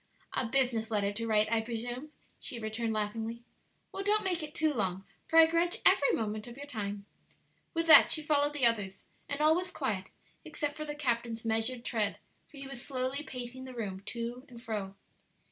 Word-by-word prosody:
"A 250 - 0
business 240 -3 +1
letter 205 -2 +1
to 230 +2 -3
write, 215 -1 +3
I 225 -1 +3
presume," 240 +5 -4 0.3
she 255 - -3
returned 225 +1 -2
laughingly. 225 +2 -3 0.5
"Well, - - -4
don't 425 +1 +3
make 360 -3 0
it 305 0 -7
too 310 -1 +2
long, 190 -5 -1 0.2
for 325 - +2
I 325 - +11
grudge 335 +2 +1
every 330 -7 +6
moment 215 0 -2
of 240 +1 -10
your 285 - -7
time." 205 -6 -5 0.7
With 330 0 +1
that 320 - +9
she 310 - +2
followed 290 -1 +3
the 285 -4 +3
others, 205 -5 +1 0.2
and 285 - -2
all 310 +1 +6
was 365 +1 -1
quiet 220 - -2 0.4
except 295 -2 -3
for 305 - -4
the 295 -1 -5
captain's 235 -5 -1
measured 225 +2 0
tread, 215 -4 0 0.3
for 300 - -15
he 275 - -7
was 270 -3 -7
slowly 260 +1 -2
pacing 255 -2 -7
the 260 -1 -9
room 200 -5 -4
to 240 +1 -4
and 240 -2 -11
fro. 210 -5 -4
240 Hz, 195 wpm, -31 LUFS, 220-295 Hz, 0.7 s, I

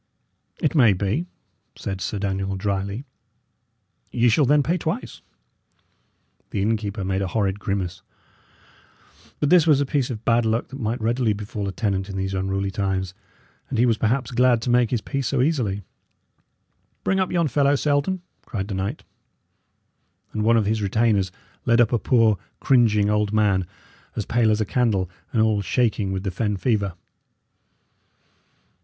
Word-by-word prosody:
"It 150 - +1
may 120 -10 +5
be," 100 - -1 0.5
said 95 -1 -5
Sir 105 - -2
Daniel, 95 -1 -2
dryly. 100 +5 -2 1.1
"Ye 120 0 +3
shall 140 +6 +4
then 145 +2 +4
pay 170 +6 +1
twice." 160 -2 -4 1.3
The - - -3
innkeeper 105 -2 -1
made 95 +1 -1
a 95 - -1
horrid 100 -1 -1
grimace; 95 -3 -3 1.4
but 145 - +1
this 175 -3 +6
was 150 -3 +5
a 140 - +1
piece 135 -2 0
of 115 -3 -6
bad 120 0 +3
luck 110 +1 0
that 135 - -8
might 115 +1 -2
readily 115 0 +1
befall 105 0 -5
a - - -2
tenant 95 -1 -2
in 95 - -5
these 95 0 -2
unruly 95 +1 -1
times, 95 -2 -2 0.6
and 130 - -2
he 120 - +4
was 115 -3 +2
perhaps 120 +2 0
glad 125 -1 +4
to 125 - 0
make 120 -2 +3
his 120 -4 -1
peace 140 0 -3
so 140 - 0
easily. 125 -9 0 1.2
"Bring 190 - +1
up 185 - 0
yon 170 -3 +2
fellow, 140 0 +3
Selden!" 150 +6 0 0.2
cried 100 -2 -5
the - - -3
knight. 100 +9 -3 1.3
And 110 - -2
one 115 +1 +4
of 110 - +2
his 110 +1 0
retainers 100 -2 +1 0.4
led 115 0 +4
up 120 +1 +4
a 120 - +3
poor, 115 -5 +3 0.2
cringing 110 -6 +3
old 105 -1 +1
man, 100 -4 +2 0.5
as - - -2
pale 120 -2 +2
as 105 0 +2
a 110 - +1
candle, 100 -6 0 0.2
and 110 -2 +2
all 110 -2 +2
shaking 105 -2 0
with 95 0 -3
the 95 - -2
fen 105 +2 -1
fever. 100 -5 0
110 Hz, 165 wpm, -23 LUFS, 100-125 Hz, 1.4 s, this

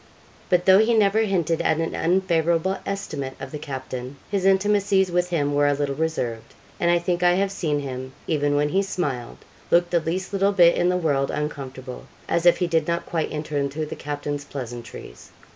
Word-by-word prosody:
But 180 -1 +2
though 190 +1 +7
he 225 +2 +3
never 210 0 +3
hinted 175 -7 +1
at 155 - +2
an 165 - -2
unfavourable 170 0 +1
estimate 145 -9 -4
of - - -7
the 150 - -5
captain, 130 -2 -6 0.2
his 195 -2 0
intimacies 195 -1 +3
with 180 0 +1
him 145 -4 0
were 145 0 +3
a 145 - +2
little 140 -1 -1
reserved; 135 -7 -3 0.2
and 170 - +2
I 175 - +4
think 175 0 -1
I 175 0 +5
have 195 +2 +1
seen 150 -6 -1
him, 130 -1 -6
even 145 -2 +1
when 145 +1 +2
he 190 +5 +2
smiled, 145 -11 -3 0.3
look 175 0 +3
the 175 - +3
least 180 +5 -3
little 200 +1 +2
bit 175 -3 +6
in 175 - +2
the 180 - +2
world 145 -5 0
uncomfortable, 135 -4 -5 0.2
as 170 +1 +1
if 175 - +6
he 180 - 0
did 165 -2 0
not 170 0 -1
quite 165 -2 -2
enter 150 -1 -3
into 140 +3 -2
the 150 - -6
captain's 145 0 -4
pleasantries. 120 -4 -8
165 Hz, 195 wpm, -23 LUFS, 145-180 Hz, 0.3 s, though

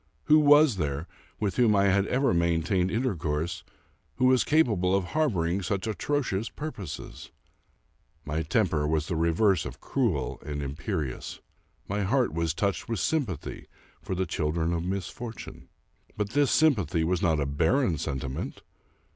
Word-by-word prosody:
Who 155 - +5
was 145 -5 +6
there, 75 -1 -2 0.3
with 100 -3 -1
whom 115 -4 +4
I 100 - +4
had 100 +1 +2
ever 135 0 +2
maintained 85 +2 +1
intercourse, 85 - -2 0.5
who 130 - +1
was 130 -1 +5
capable 105 - +2
of 100 - +1
harboring 95 - 0
such 100 +1 -2
atrocious 115 -2 -1
purposes? 130 - -7 1.0
My 75 +2 -2
temper 80 -3 +1
was 80 0 0
the 85 - -3
reverse 85 +2 +2
of 65 0 -8
cruel 100 - -1
and 75 -1 -4
imperious. 70 -1 -4 0.5
My 100 +2 -1
heart 120 - +1
was 80 -1 -1
touched 100 +2 -1
with 115 -4 -1
sympathy 120 - -2 0.3
for 95 - -4
the 95 +1 0
children 80 +1 -1
of 85 -1 -1
mis 95 +1 -2
fortune. 120 -2 -9 0.5
But 105 -1 -1
this 145 +1 +3
sympathy 100 - +3
was 85 +2 0
not 80 -3 +2
a 70 - 0
barren 80 - +1
sentiment. 65 0 -4
95 Hz, 145 wpm, -27 LUFS, 80-115 Hz, 1.0 s, was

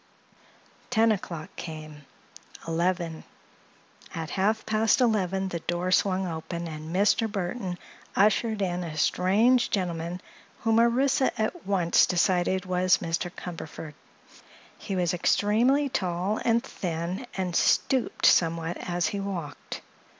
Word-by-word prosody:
Ten 225 +1 +4
o'clock 170 -6 -5
came. 155 -3 -8 0.6
Eleven. 170 -1 -1 0.9
At 160 -1 -4
half 215 +3 0
past 220 +2 +2
eleven 195 -5 +1
the 170 - -3
door 175 +2 -2
swung 190 0 +2
open 170 0 -5
and 155 0 -7
Mr. 205 +4 +2
Burthon 190 -1 -3 0.4
ushered 215 +1 +2
in 180 -1 -1
a 155 -2 -6
strange 215 +11 +3
gentleman 175 -2 -2 0.4
whom 225 0 +3
Orissa 260 +3 +2
at 220 - -2
once 180 -4 +3
decided 180 +1 +1
was 185 0 +3
Mr. 165 +2 -2
Cumberford. 165 -3 -8 0.8
He 195 - -5
was 180 -2 +1
extremely 230 - +2
tall 185 -3 -1
and 235 0 +2
thin 175 +6 -4
and 180 -2 -2
stooped 260 -3 +2
somewhat 165 0 +3
as 175 -1 -2
he 200 - -3
walked. 175 -9 -6
185 Hz, 120 wpm, -27 LUFS, 170-215 Hz, 0.9 s, Ten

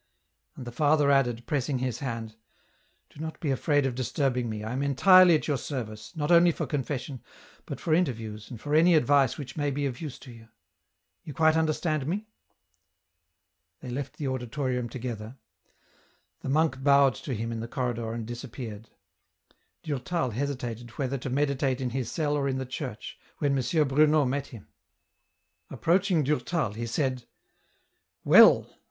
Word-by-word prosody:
And 125 - -8
the 120 - -6
father 145 +1 +3
added, 120 -4 +1
pressing 140 -1 -1
his 125 -1 -3
hand, 115 -5 -5 0.4
" - - -41
Do - - -16
not 160 0 -6
be 155 -6 -1
afraid 145 +2 +1
of 135 - -1
disturbing 125 0 -1
me, 105 -1 -5
I 110 +3 -4
am 130 - -2
entirely 180 +6 +6
at 155 - -2
your 145 -4 0
service, 115 - -6
not 150 +1 -1
only 170 0 +6
for 160 - -3
confession, 135 -1 -4 0.5
but - - -6
for 160 - 0
interviews 115 - -1
and 120 - -8
for 145 +4 -4
any 165 +3 +5
advice 140 -3 +3
which 130 -4 -8
may 145 -2 0
be 140 +1 -2
of 130 0 -4
use 145 -5 -6
to 130 - -11
you; 115 -1 -14 0.8
you 150 - -9
quite 160 0 +4
understand 155 -2 0
me?" 200 +6 -2 1.6
They 125 - -7
left 135 +2 -5
the 145 - -3
auditorium 125 -1 -2
together; 120 -1 -6 1.0
the - - -6
monk 150 -2 +1
bowed 140 -2 +5
to 130 - -5
him 115 +2 -3
in 115 - -4
the 115 - -5
corridor 120 -3 -3
and 115 -1 -4
disappeared. 115 -2 -8 0.9
Durtal 145 -1 -2
hesitated 120 -2 -4
whether 135 -1 -2
to 130 - -5
meditate 135 -1 0
in 125 -2 -2
his 130 -1 -3
cell 150 -3 0
or 140 -1 0
in 130 - -1
the 130 - -3
church, 130 -3 -7 0.2
when 140 -2 +1
M. 140 +4 +1
Bruno 150 +2 +4
met 140 +2 -2
him. 115 -6 -12 1.0
Approaching 170 - +1
Durtal 150 - -1
he 115 +2 -5
said, 130 0 -2 0.5
*' - - -47
Well - - +7
135 Hz, 170 wpm, -27 LUFS, 120-150 Hz, 1.6 s, Well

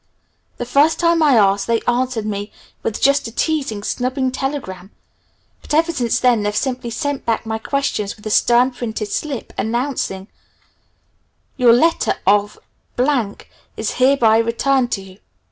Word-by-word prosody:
The 245 - -4
first 285 +6 +3
time 335 -1 +2
I 295 -4 +5
asked, 200 -2 +3
they 230 -1 +2
answered 245 -2 -1
me 205 0 -4 0.3
with 220 - -3
just 280 -1 +3
a - - -8
teasing, 270 -6 -2
snubbing 255 +3 -1
telegram, 255 -9 -5 0.7
but - - -3
ever 325 +2 +3
since 245 -6 0
then 245 -3 +3
they've 205 0 -2
simply 250 +1 -2
sent 285 +3 -3
back 230 0 -1
my 220 0 -3
questions 250 -6 -2
with 210 - -19
a 215 - -3
stern 245 +4 +4
printed 225 -4 -5
slip 280 -1 -4
announcing, 230 -5 -2 1.3
"Your 250 -3 +5
letter 325 +7 +2
of 205 +1 +2 1.2
is 220 - -2
hereby 250 -4 +3
returned 240 +2 +1
to 195 - -3
you. 190 +1 -15
240 Hz, 145 wpm, -19 LUFS, 215-275 Hz, 1.3 s, I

